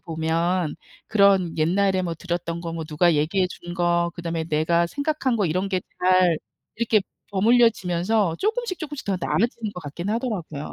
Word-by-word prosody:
보면 165 +1 -1 0.3
그런 195 -5 +4
옛날에 185 +3 +2
뭐 170 -2 -2
들었던 170 0 -4
거 165 -1 -5
뭐 165 -1 -4
누가 160 +2 +2
얘기해 180 +5 +1
준 175 -1 -8
거 170 -1 +1
그다음에 165 -1 -3
내가 165 +2 +1
생각한 285 - -1
거 205 -5 +1
이런 185 +5 -1
게 185 -2 0 0.2
잘 180 -3 +4 0.4
이렇게 225 -2 +2 0.3
버무려지면서 205 -3 +2
쪼끔씩, 440 -2 -1
쪼끔씩 295 -4 -6
더 195 -2 -1
나아지는 230 +1 0
것 180 - -6
같긴 165 +6 -6
하더라고요. 205 - -3
180 Hz, 345 characters per minute, -24 LUFS, 170-210 Hz, 0.4 s, 그런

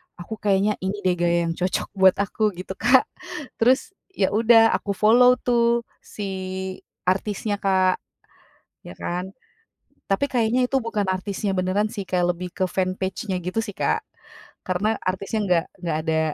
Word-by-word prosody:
aku 205 +5 -8
kayaknya 200 +1 +2
ini 195 +2 -4
deh 185 - +3
gaya 170 0 +2
yang 165 - -1
cocok 185 +1 -1
buat 190 -2 +5
aku 205 0 0
gitu 185 +2 -7
Kak, 250 +3 +5 0.6
terus 255 +9 +3 0.2
ya 190 - +1
udah 225 +1 +5
aku 200 -1 -1
follow 245 +5 +6
tuh 235 -1 +2 0.2
si 205 - -7 0.8
artisnya 205 +2 -1
Kak, 190 -1 +2 0.9
ya - - -8
kan. 180 +2 -3 0.8
Tapi 195 +8 +2
kayaknya 245 +1 +2
itu 270 - +1
bukan 220 -3 -1
artisnya 195 +1 -2
beneran 190 +3 0
sih, 205 - -4
kayak 180 -1 +2
lebih 180 +1 -6
ke 190 - +1
fan 185 0 -1
page-nya 190 0 -3
gitu 185 +5 -1
sih 210 -3 -6
Kak, - - +1 0.7
karena 205 +4 0
artisnya 195 +4 -2
enggak 180 -4 +2 0.2
enggak 165 -3 -1
ada, 160 0 +2
195 Hz, 155 wpm, -23 LUFS, 185-220 Hz, 0.9 s, follow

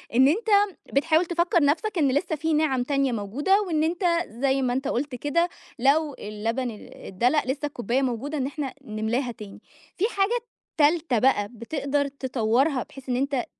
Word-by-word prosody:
إن 260 +2 +6
أنت 435 +10 0 0.4
بتحاول 315 +5 +3
تفكّر 345 -1 +2
نفْسك 355 +8 +1
إن 285 -5 +3
لسّه 315 +3 0
في 320 +2 -1
نِعَم 295 -5 +2
تانية 275 0 +1
موجودة 265 - +1
وإن 310 -3 +1
أنت 340 +3 -1 0.2
زي 265 +3 0
ما 245 -1 0
أنت 265 +2 -2
قُلت 275 0 -2
كده 315 +7 0 0.3
لو 285 +3 +2
اللبن 225 +4 -3
أ 210 - -12
أتدلق 245 +10 +1
لسّه 280 +3 -2
الكوباية 245 -2 -1
موجودة 270 +4 -2
إن 265 - -1
إحنا 280 -2 -4
نملاها 225 +3 -2
تاني، 210 -4 -11 0.4
في 380 - +2
حاجة 400 +5 +2 0.4
تالته 305 -4 +3
بقى 210 -4 +3
بتقدر 280 +4 -2
تطوّرها 260 0 0
بحيث 270 -1 -13
إن 250 - +1
أنت 270 -1 0
275 Hz, 170 wpm, -25 LUFS, 245-310 Hz, 0.4 s, إن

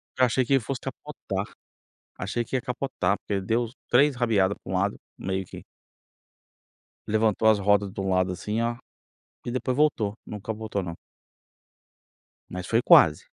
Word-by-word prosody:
Porque 130 - 0
eu - - +7
achei 125 +2 +1
que 125 - -2
ele 135 - +5
fosse 125 +3 -4
capotar. - - -5 0.7
Achei 110 +6 -2
que 130 - -5
ia 125 - +1
capotar, 120 -7 -1
porque 100 -2 -2
deu 115 +4 0 0.2
3 140 +3 +4
rabiada 105 -6 +2
para - - -10
um - - -1
lado, 100 +2 0 0.2
meio 95 0 -3
que - - -10 1.4
levantou 110 0 +2
as 110 - +5
rodas 100 0 +2
de - - -6
um 95 - -2
lado 95 0 +2
assim, 105 +5 -3
ó, 120 0 -1 0.7
e 120 - -3
depois 130 +1 -1
voltou. 120 -9 +2
Não 105 -2 -7
capotou, 110 -2 -3
não. 85 -2 -5 1.5
Mas 90 0 -6
foi 115 +1 +2
quase. 75 -8 +6
110 Hz, 165 wpm, -26 LUFS, 95-120 Hz, 1.5 s, eu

